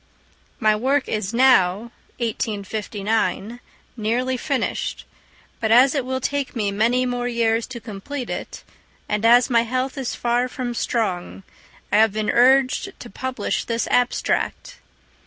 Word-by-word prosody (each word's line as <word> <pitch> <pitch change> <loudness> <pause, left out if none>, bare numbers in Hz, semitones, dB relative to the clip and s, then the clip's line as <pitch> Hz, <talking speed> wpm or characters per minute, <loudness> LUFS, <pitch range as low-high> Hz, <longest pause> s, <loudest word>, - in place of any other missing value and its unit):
My 215 -3 +3
work 265 +5 +1
is 210 -2 -2
now 235 -4 +3 0.3
(1859) 220 0 -2 0.4
nearly 245 +3 -1
finished; 275 +1 -2 0.5
but 220 - -1
as 255 +4 +6
it 280 -3 0
will 260 +1 -2
take 280 +1 -2
me 210 -4 0
many 235 +5 +2
more 245 -1 -2
years 230 -1 +1
to 255 -2 -7
complete 240 +5 -6
it, - - -6 0.4
and 210 +1 -1
as 240 +2 +6
my 235 -1 +5
health 255 +3 -2
is 255 -2 -3
far 240 +1 0
from 250 -1 -4
strong, 195 -6 -2 0.5
I 205 - +4
have 220 -1 +4
been 215 0 0
urged 265 +9 +3
to 240 - -9
publish 260 +5 -3
this 230 -1 -1
abstract. 245 - 0
235 Hz, 140 wpm, -22 LUFS, 220-255 Hz, 0.5 s, as